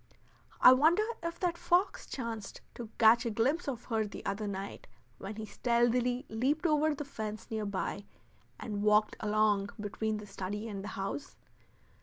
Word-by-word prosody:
I 255 - +9
wonder 320 +10 +4 0.2
if 335 0 -4
that 345 -2 0
fox 360 +3 +1
chanced 230 -5 -5
to 235 -2 -8
catch 230 +1 +6
a 235 - -1
glimpse 255 +10 0
of 245 -4 -4
her 220 -3 0
the - - -9
other 205 +2 -2
night 195 0 -6 0.3
when 200 +2 -6
he 215 0 -5
stealthily 245 +3 +1
leaped 270 +9 0
over 305 -1 +3
the 295 - -5
fence 215 -6 -6
near 215 -2 -2
by 200 0 -3 0.5
and 205 -3 -4
walked 210 0 +3
along 210 -1 +2
between 215 +1 -2
the 210 - -8
study 200 +2 -5
and 200 -3 -5
the - - -6
house? 195 +9 -4
220 Hz, 165 wpm, -32 LUFS, 210-260 Hz, 0.5 s, I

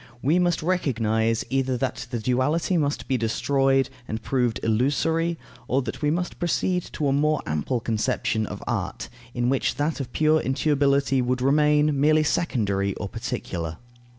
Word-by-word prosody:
We 155 +7 +3
must 175 -3 +1
recognize, 115 -10 0
either 130 -1 +1
that 130 0 -3
the 120 - -2
duality 130 - +1
must 145 -3 -1
be 130 - +1
destroyed 135 +4 +1 0.2
and 110 - -3
proved 125 -3 0
illusory, 155 +9 +1 0.3
or 135 +2 +1
that 115 +3 -6
we 150 - +2
must 175 +3 -2
proceed 180 +1 0
to 150 - -1
a 135 - +2
more 150 +2 +1
ample 75 - -1
conception 110 -1 -1
of - - -7
art, - - -3 0.3
in 120 0 0
which 135 +1 +1
that 150 +2 -1
of 125 -3 -5
pure 155 0 +3
intuibility 140 -1 +2
would 125 +1 -1
remain 150 +1 +3
merely 155 +1 +4
secondary 100 - 0
or 100 - -5
particular. 80 -2 -4
135 Hz, 155 wpm, -24 LUFS, 120-150 Hz, 0.3 s, merely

